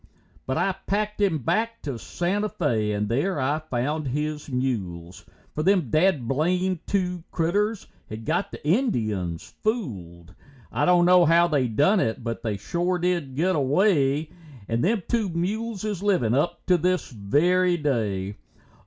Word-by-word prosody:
But 130 - -1
I 195 - +2 0.2
packed 210 +1 -1
him 190 -6 +2
back 225 - -1
to 135 -6 -4
Santa 200 - -1
Fé 110 - 0
and 105 0 -1
there 145 - 0
I 145 +4 0
found 150 +1 -2
his 150 +3 -3
mules, 90 - -3 0.3
For 155 - -2
them 180 - +2
dad 155 -7 +2
blamed 180 +6 0
two 180 -3 -1
critters 205 +6 0 0.2
had 110 +1 -7
got - - 0
the - - -8
Indians 110 - -1
fooled. 95 - -4 0.4
I - - +1
don't 180 -1 +5
know 180 -1 +6
how 170 +2 +5
they 145 -6 +1
done 145 - +3
it, 115 -5 -1
but 115 -1 -4
they 110 -3 -2
shore 175 - -1
did 175 -7 -1
get 180 +6 +1
away, 150 0 +2 0.4
And 115 +1 0
them 200 +2 +1
two 225 -4 0
mules 205 +5 -3
is 210 -4 -3
livin' 180 - +2
up 145 +6 0
to 180 -2 +3
this 180 0 0
very 175 - +2
day. 105 - -1
155 Hz, 155 wpm, -25 LUFS, 120-185 Hz, 0.4 s, know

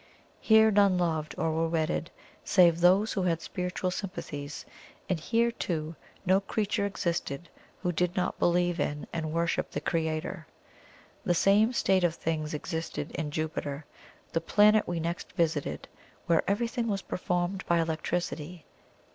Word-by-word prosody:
Here, 220 0 +5
none 200 -2 +4
loved 160 -3 -1
or 160 - 0
were 165 +1 +1
wedded 165 0 -1 0.3
save 175 -3 +4
those 190 +5 +4
who 195 - -1
had 170 -3 +1
spiritual 180 +1 -3
sympathies, 150 -7 -6 0.4
and 185 -3 0
here, 230 +7 +1
too, 160 -7 -3 0.3
no 190 +1 +4
creature 205 +1 -1
existed 170 -5 -3 0.3
who 180 - +1
did 180 +1 0
not 180 - -1
believe 175 0 +2
in 145 0 -2
and 155 -2 -2
worship 170 +1 0
the - - -3
Creator. 160 0 -2 0.8
The 175 - +2
same 205 +6 +4
state 190 -6 +2
of 170 -1 +2
things 155 -2 -2
existed 165 +2 -4
in 155 -2 -3
Jupiter, 150 -1 -3 0.5
the 165 - +1
planet 210 +5 +4
we 175 -1 -2
next 170 +1 -4
visited, 160 -5 -1 0.4
where 165 -1 +3
everything 230 +3 0
was 200 -3 -1
performed 180 +1 -2
by 170 -1 +3
electricity. 165 0 -3
175 Hz, 145 wpm, -29 LUFS, 160-190 Hz, 0.8 s, Here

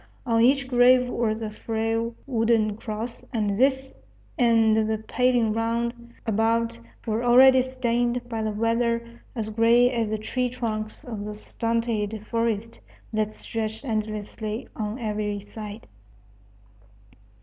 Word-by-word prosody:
On 230 -2 +2
each 265 +2 +4
grave 250 0 +5
was 225 -2 -1
a 215 - -4
frail 225 +1 -2
wooden 225 -4 +2
cross, 220 +2 -6
and 210 -3 0
this 265 +5 +1 0.4
and 230 -4 +4
the 220 - +1
paling 240 0 +1
round 235 +1 -2
about 225 - +1 0.3
were 225 +1 -1
already 260 +2 +7
stained 245 -1 0
by 225 -2 -3
the 220 - -1
weather 235 +2 -1
as 220 -2 -3
gray 235 +3 +4
as 230 -3 -1
the 215 - -1
tree 250 +4 -1
trunks 220 -3 -4
of 220 -5 -6
the 210 0 -5
stunted 220 -1 -2
forest 230 -1 -2 0.3
that 215 0 0
stretched 220 +3 -4
endlessly 215 -1 -3
on 215 +1 -3
every 210 -3 -2
side. 210 +1 -9
230 Hz, 125 wpm, -25 LUFS, 215-240 Hz, 0.4 s, already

